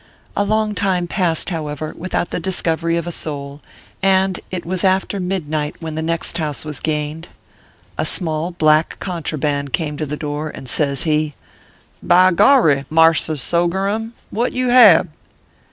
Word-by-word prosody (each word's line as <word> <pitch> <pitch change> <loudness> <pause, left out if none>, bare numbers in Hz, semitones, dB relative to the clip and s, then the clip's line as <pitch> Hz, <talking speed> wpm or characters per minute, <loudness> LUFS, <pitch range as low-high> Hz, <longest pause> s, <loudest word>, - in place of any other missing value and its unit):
A 205 - +2
long 215 +1 0
time 190 -3 0
passed, 175 -1 -1
however, 155 -2 -4
without 175 0 -3
the - - -2
discovery 165 -2 0
of 170 - -3
a 175 - -4
soul, 145 -3 -6 0.4
and 190 -1 +2
it 185 -2 -5
was 185 +2 -2
after 190 +1 +1
midnight 155 -5 -2
when 160 -2 -6
the 160 - -3
next 165 +1 -2
house 150 -2 -3
was 150 -2 -4
gained. 155 +1 -3 0.7
A - - +2
small 160 -2 0
black 155 -2 +2
contraband 150 -6 -3
came 150 -3 -1
to 155 - -3
the 150 +2 -4
door, 150 +1 -4
and 135 - -10
says 140 0 0
he: 155 -2 0 0.3
" - - -31 0.3
By 185 +1 +5
gorry, 165 - +4
mars 160 0 +4
r 155 - -1
sogerum, 190 - -1 0.2
what 235 +3 -1
you 255 0 0
hab 215 -9 +7
?" - - -38
165 Hz, 165 wpm, -19 LUFS, 150-185 Hz, 0.7 s, hab